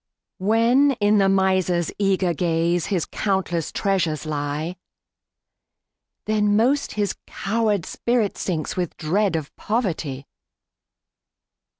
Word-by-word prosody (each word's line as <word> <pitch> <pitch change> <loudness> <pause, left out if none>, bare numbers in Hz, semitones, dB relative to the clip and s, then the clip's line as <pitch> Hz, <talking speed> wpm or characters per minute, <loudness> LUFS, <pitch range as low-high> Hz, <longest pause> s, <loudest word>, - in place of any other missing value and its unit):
When, 230 +8 +3
in 210 -3 +2
the 195 -1 +4
miser's 185 -3 +2
eager 190 -3 +2
gaze, 170 +1 0
His 185 -6 0
countless 190 -5 -1
treasures 170 -7 0
lie, 150 +3 -3 1.5
Then 210 -1 +2
most 260 +7 +2
his 205 -2 -1
coward 210 -3 -1
spirit 235 -4 0
sinks, 160 -5 -3
With 180 -3 -3
dread 185 +4 +1
of 155 -3 -4
poverty. 165 - -2
190 Hz, 100 wpm, -23 LUFS, 165-210 Hz, 1.5 s, the